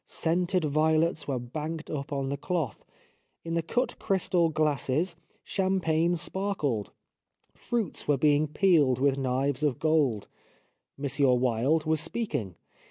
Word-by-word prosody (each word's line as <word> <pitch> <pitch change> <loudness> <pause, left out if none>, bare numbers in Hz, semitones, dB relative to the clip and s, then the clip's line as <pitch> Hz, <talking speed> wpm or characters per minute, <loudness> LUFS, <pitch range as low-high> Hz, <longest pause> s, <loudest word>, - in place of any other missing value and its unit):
Scented 175 +1 0
violets 155 +2 +1
were 135 -3 -1
banked 155 +6 -5
up 140 -1 -4
on 135 -1 -2
the 140 - -1
cloth. 155 - -3 0.6
In 165 - -3
the 170 - +1
cut 245 +10 -2
crystal 180 -4 +1
glasses 155 +2 0 0.3
champagne 175 -3 +1
sparkled; 170 - -1 0.6
fruits 230 -8 -2
were 145 -1 +3
being 150 +2 +3
peeled 150 -5 +3
with 140 +1 +2
knives 135 +1 0
of 145 -5 +1
gold. 150 -9 +1 0.7
M. 140 - -2 0.3
Wilde 130 +6 +1
was 155 -1 +1
speaking. 155 - -3
155 Hz, 125 wpm, -28 LUFS, 140-170 Hz, 0.7 s, were